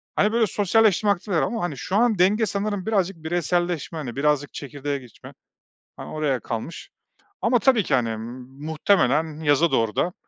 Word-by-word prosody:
Hani, 210 - +3
böyle 230 -1 +2
sosyalleşme 210 +1 +2
aktiviteler 195 -3 0
ama, 230 -4 -2
hani, 155 -6 -3
şu 185 +9 -4
an 225 -2 +3
denge 205 +5 +4
sanırım 205 -1 -3
birazcık 195 -4 0
bireyselleşme, 175 0 -1
hani, 130 -7 -5
birazcık 145 0 0
çekirdeğe 145 0 -4
geçme, 125 -4 -14 0.6
hani, - - -8
oraya 150 -4 -1
kalmış. 115 +9 -6 0.5
Ama 240 +1 +3
tabii 245 -4 +3
ki, 145 - +1
hani, 120 -3 0
m 115 +3 -6 0.2
muhtemelen 160 -2 +1
yaza 155 +2 +3
doğru 115 -2 +1
da, 180 - 0
165 Hz, 165 wpm, -23 LUFS, 145-205 Hz, 0.6 s, denge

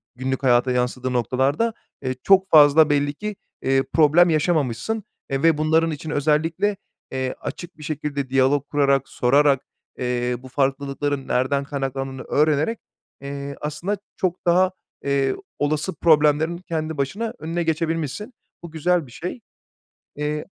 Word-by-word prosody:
günlük 130 +1 -3
hayata 125 0 +3
yansıdığı 125 +1 -1
noktalarda, 135 - +1 0.3
eee, 130 0 -2
çok 190 0 +4
fazla 150 0 +7
belli 145 0 +1
ki, 210 +6 -5 0.3
eee, 135 0 +2
problem 165 +3 +5
yaşamamışsın. 155 - 0 0.3
Eee, 135 +2 -2
ve 165 -2 +4
bunların 160 +1 +2
için 155 +1 -6
özellikle, 160 +7 +1 0.3
eee, 130 -1 -2
açık 175 +1 -7
bir 155 - -11
şekilde 145 -3 -3
diyalog 135 +2 +2
kurarak, 140 -2 +2
sorarak, 140 +2 +3 0.4
eee, 125 0 -1
bu 130 - -12
farklılıkların 140 +1 -1
nereden 135 +2 +1
kaynaklandığını 135 -2 -4
öğrenerek, 155 +8 +1 0.4
eee, 140 0 -6
aslında 155 +7 -3 0.2
çok 185 -1 -2
daha, 180 +2 +4 0.3
eee, 140 -1 +1 0.2
olası 155 +5 0
problemlerin 155 +1 +3
kendi 160 -3 -4
başına 205 +12 -2
önüne 165 +2 -2
geçebilmişsin. 165 - -2 0.3
Bu 170 - -8
güzel 165 0 +1
bir 120 - -16
şey. 180 - -6 0.8
Eee, 150 +1 -2
145 Hz, 135 wpm, -22 LUFS, 135-165 Hz, 0.8 s, fazla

